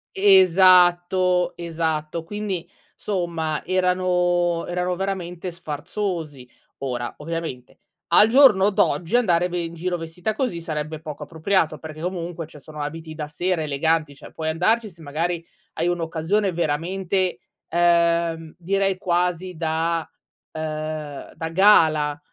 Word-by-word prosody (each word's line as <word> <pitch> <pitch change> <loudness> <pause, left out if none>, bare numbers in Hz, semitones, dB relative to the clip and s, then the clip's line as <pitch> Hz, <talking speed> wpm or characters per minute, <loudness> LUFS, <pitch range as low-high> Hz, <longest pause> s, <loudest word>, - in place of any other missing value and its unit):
Esatto, 180 -2 +5
esatto. 160 -1 -3
Quindi 200 -1 -4 0.2
insomma, 170 -5 -2
somma - - -5
erano 180 -1 +1
erano 180 0 -1
veramente 185 -1 -4
sfarzosi. 160 -3 -5 0.3
Ora, 125 -3 -3
ovviamente, 160 -5 -6 0.3
al 215 - +6
giorno 225 -6 +6
d'oggi 180 0 +1
andare 180 -8 +3
ve 175 -1 -3
in 165 - -6
giro 175 +2 -2
vestita 170 +5 -4
così 235 -10 -1
sarebbe 155 -1 -4
poco 150 -2 -7
appropriato, 160 +1 0
perché 155 +1 -9
comunque, 175 -2 -4
cioè, 150 -1 -14
sono 150 +1 -9
abiti 160 +2 -6
da 150 -1 -5
sera, 175 +3 -1
eleganti, 155 +1 0
cioè, - - -13
puoi 160 -1 -3
andarci 215 +8 +1
se 170 -3 -17
magari 165 +3 -2 0.3
hai 165 +2 -1
un'occasione 175 +4 0
veramente, 175 +1 -1 0.3
ehm, 170 -1 +2
direi 195 +2 0
quasi 180 0 -1
da 165 0 -1 0.4
ehm, 155 -2 -5
da 160 - -4
gala; 160 -5 +4
170 Hz, 125 wpm, -23 LUFS, 160-185 Hz, 0.4 s, al